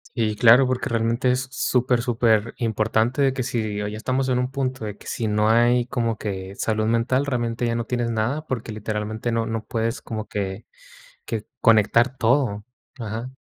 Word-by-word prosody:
Y 110 -3 0
claro, 120 +4 +7
porque 130 0 -1
realmente 115 +3 +1
es 130 +1 -1
super, 125 0 +1
superimportante 115 +2 +1
que 130 -2 -3
si 110 -5 -2
hoy 105 +1 -4
estamos 130 +4 -1
en 125 -1 +2
un 125 0 -1
punto 130 -3 -3
de 105 -1 -6
que - - -17
si 115 - -2
no 105 +1 +2
hay 120 +1 +4
como 120 -3 -1
que 95 -2 -5
salud 110 0 0
mental, 130 +4 +1
realmente 120 -2 -1
ya 115 - 0
no 115 0 -2
tienes 120 -1 -1
nada, 120 +7 -1
porque 120 -3 -4
literalmente 110 +2 -3
no 115 0 0
no 115 -1 -3
puedes 115 +2 -2
como 110 -1 -5
que 100 0 -4 0.6
que 110 -2 -4
conectar 115 +3 +4
todo, 115 -4 +1 0.3
ajá. 115 +2 -5
115 Hz, 175 wpm, -23 LUFS, 110-125 Hz, 0.6 s, claro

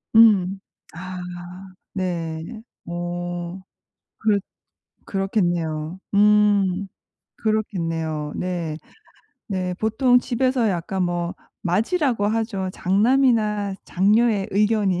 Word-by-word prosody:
음. 195 -4 +6 0.3
아. 185 +1 -7 0.8
네. 175 +2 -3 0.2
어. 175 +1 -4 0.6
그렇 215 -2 +3 0.7
그렇겠네요. 175 -4 -1 0.2
음. 200 -2 +4 0.5
그렇겠네요. 165 -8 -1
네. 170 -4 -3 0.7
네. 185 -2 -2
보통 225 +5 +3
집에서 245 -1 +1
약간 185 +1 -1
뭐 175 0 -1 0.3
맏이라고 225 - +1
하죠. 215 -3 -1
장남이나 210 -1 +2
장녀의 205 +2 +2
의견이 205 -3 +2
195 Hz, 170 characters per minute, -23 LUFS, 175-215 Hz, 0.8 s, 음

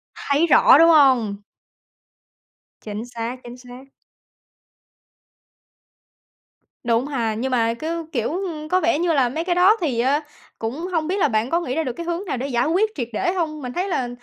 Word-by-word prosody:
Thấy 290 +4 0
rõ, 300 - +6
đúng 330 +2 +6
hông? 250 -10 +3 1.4
Chính 210 +1 -6
xác, 240 0 -6
chính 240 +1 -10
xác. 250 +1 -13 3.0
Đúng 235 +2 +1
ha, 235 -6 -2
nhưng 250 +5 -3
mà 230 -2 +1
cứ, 325 +6 -4
kiểu, 235 -7 -1
ưm 335 -5 -5
có 370 - +3
vẻ 335 -2 +1
như 340 -1 +1
là 265 -5 +2
mấy 315 +7 -3
cái 350 0 -1
đó 375 +5 +5
thì, 270 -8 -1
ơ, 270 +5 +2 0.4
cũng 265 +10 -4
hông 320 -3 -1
biết 375 +3 -1
là 355 - +3
bạn 220 -1 -1
có 335 - +1
nghĩ 330 -7 -4
ra 320 - 0
được 255 -5 -4
cái 340 - -7
hướng 345 +3 -3
nào 300 - -3
để 260 +3 -3
giải 245 -1 0
quyết 420 +7 +1
triệt 245 -5 -4
để 355 - 0
hông? 315 -5 -3
Mình 250 -2 -6
thấy 365 +6 -2
là, 255 -9 -1
280 Hz, 190 wpm, -21 LUFS, 240-335 Hz, 3.0 s, rõ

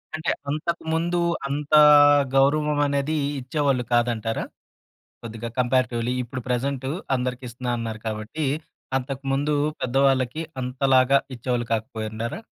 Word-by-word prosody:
అంటే, 160 +1 -1 0.2
అంతకు 155 +3 -2
ముందు 170 +2 0 0.3
అంత 145 +2 -4 0.6
గౌరవం 150 +2 +3
అనేది 140 +2 -1 0.2
ఇచ్చేవాళ్ళు 135 -1 0
కాదంటారా? 115 -2 0 0.8
కొద్దిగా 115 0 -6
కంపేరేటివ్లి 125 -1 +1
ఇప్పుడు 125 +1 -6
ప్రెజెంటు 130 +1 -1 0.3
అందరికిస్తున్నా 125 -1 -4
అన్నారు 110 -1 -4
కాబట్టి. 110 +8 -3 0.5
అంతకు 135 +1 -5
ముందు, 145 +2 0 0.3
పెద్దవాళ్ళకి 135 +2 +1 0.2
అంతలాగా 130 +1 +3 0.2
ఇచ్చేవాళ్ళు 120 0 -2
కాకపోయిండారా? 110 - -4
130 Hz, 100 wpm, -24 LUFS, 120-140 Hz, 0.8 s, గౌరవం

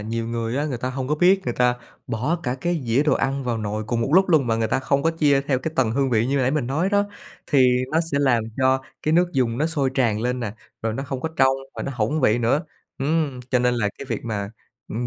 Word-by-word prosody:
nhiều 115 +2 -3
người 115 +1 -2
á 145 - 0
người 130 -5 -3
ta 130 +2 -3
hông 130 0 -4
có 150 - +2
biết, 185 +4 +4
người 120 - -2
ta 125 0 +2 0.3
bỏ 130 +9 -1
cả 125 -1 -1
cái 175 -3 -1
dĩa 115 +5 +3
đồ 150 - +2
ăn 135 0 -1
vào 120 -2 -1
nồi 105 0 -3
cùng 115 +2 -1
một 115 - 0
lúc 190 +1 +5
luôn 155 -7 +4
mà 115 -1 +1
người 115 -1 0
ta - - +1
không 140 +1 +1
có 165 - +3
chia 145 -4 +2
theo 135 -2 0
cái 160 +4 -4
tầng 125 -4 +2
hương 135 +2 0
vị 115 0 +2
như 140 +1 0
nãy 130 -1 +2
mình 150 -4 -1
nói 155 +8 0
đó, 205 0 +2 0.4
thì 130 -3 +4 0.2
nó 160 - +3
sẽ 140 - +2
làm 120 -5 +2
cho 130 0 +3 0.2
cái 155 - +1
nước 175 +1 +4
dùng 125 -4 0
nó 155 - +2
sôi 145 -5 0
tràn 115 -5 +1
lên 125 +2 -1
nè, 105 -4 -3 0.3
rồi 115 - -1
nó 135 - -3
không 135 -1 -5
có 160 - -2
trong 130 0 +4 0.2
và - - -5
nó 140 - -4
hỏng 120 +7 0
vị 115 -3 +3
nữa. 130 +8 +1 0.3
Ừm, 145 -2 0
cho 125 - +3
nên 125 0 +2
là 110 -4 0
cái 140 - -6
việc - - -3
mà, 105 -3 -3 0.4
ừm, 120 +3 -3
130 Hz, 275 wpm, -23 LUFS, 115-145 Hz, 0.4 s, lúc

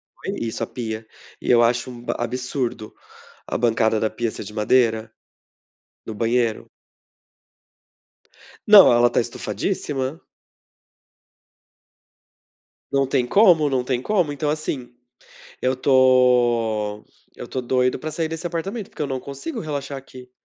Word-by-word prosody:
foi - - -8 0.2
Isso,a - - -4
pia. 110 -3 -6 0.3
E - - -5
eu 120 -1 +6
acho 120 +2 +1
um 120 -1 -11
ab - - 0
absurdo 125 -2 -4 0.5
a - - -2
bancada 110 -2 +2
da 110 - +1
pia 115 +1 -2
ser - - -8
de 105 - -10
madeira 110 0 +1 0.9
no 110 - -6
banheiro. 115 +1 0 2.0
Não. 205 -7 +9
Ela 120 0 +5
está 120 - +1
estufadíssima. 135 +4 -3 2.7
Não 135 -1 +2
tem 130 -2 +1
como. 165 - +5
Não 130 -2 0
tem 125 -1 -1
como. 180 -3 0
Então 145 +1 -2
assim, 145 -5 -4 0.7
eu 130 +1 +1
estou 120 -5 +3 0.3
eu - - -7
estou 130 - -4
doido 125 +1 +1
pra 155 +4 -5
sair 160 +1 -2
desse 165 +2 -5
apartamento, 190 +6 -4
porque - - -15
eu - - -1
não 130 -2 -3
consigo 140 - -6
relaxar 145 -3 -4
aqui. 130 -1 -13
125 Hz, 130 wpm, -22 LUFS, 115-145 Hz, 2.7 s, Não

